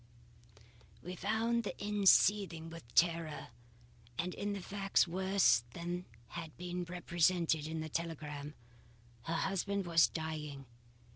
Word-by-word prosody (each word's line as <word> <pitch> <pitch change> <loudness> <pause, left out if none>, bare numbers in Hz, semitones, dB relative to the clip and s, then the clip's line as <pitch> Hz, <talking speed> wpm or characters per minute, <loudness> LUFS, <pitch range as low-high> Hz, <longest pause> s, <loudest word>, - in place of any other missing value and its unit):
"We 180 +2 -5
found 230 +5 0
the 205 - -5
inn 205 -1 -1
seething 180 -6 +4
with 155 -9 -12
terror 165 -2 +2 0.7
and 180 +2 -1
the 205 0 -3
facts 195 0 +1
worse 190 - +3
than 175 +1 -4 0.2
had 165 -3 -7
been 180 0 -4
represented 170 -2 +1
in 160 0 -3
the 155 - -4
telegram. 150 -2 -4 0.7
Her 165 - -1
husband 195 +2 -1
was 165 -1 +5
dying. 150 -4 -5
170 Hz, 120 wpm, -35 LUFS, 160-195 Hz, 0.7 s, was